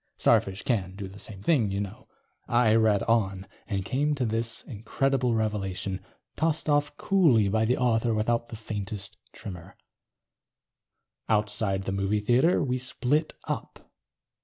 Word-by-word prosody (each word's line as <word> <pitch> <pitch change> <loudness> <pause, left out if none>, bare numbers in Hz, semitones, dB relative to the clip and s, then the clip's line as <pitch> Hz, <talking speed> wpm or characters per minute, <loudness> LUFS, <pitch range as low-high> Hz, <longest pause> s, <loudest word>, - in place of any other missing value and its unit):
Starfish 95 0 +2
can 95 -7 -1
do 100 -1 -6
the 100 +2 -12
same 100 -3 -8
thing, 125 -9 +3
you 100 +1 -2
know. 100 0 -6 0.4
I 120 -2 +4
read 110 -3 +3
on. 100 -4 +1 0.2
And 100 -3 -2
came 145 +5 0
to 130 -3 -1
this 115 0 -2
incredible 125 +2 0
revelation, 95 -3 -2 0.3
tossed 160 +1 0
off 145 -1 +1
coolly 145 - +4
by 110 +2 +2
the 125 +3 +2
author 120 -2 +2
without 115 +2 0
the - - -7
faintest 105 -2 -5 0.2
tremor: 90 -4 -9
_... - - -37 1.5
outside 105 -2 +1
the 95 - -3
movie 100 +2 0
theater 125 - +3
we 130 -2 -1
split 135 +4 0
up. - - -6
110 Hz, 145 wpm, -27 LUFS, 100-125 Hz, 1.5 s, I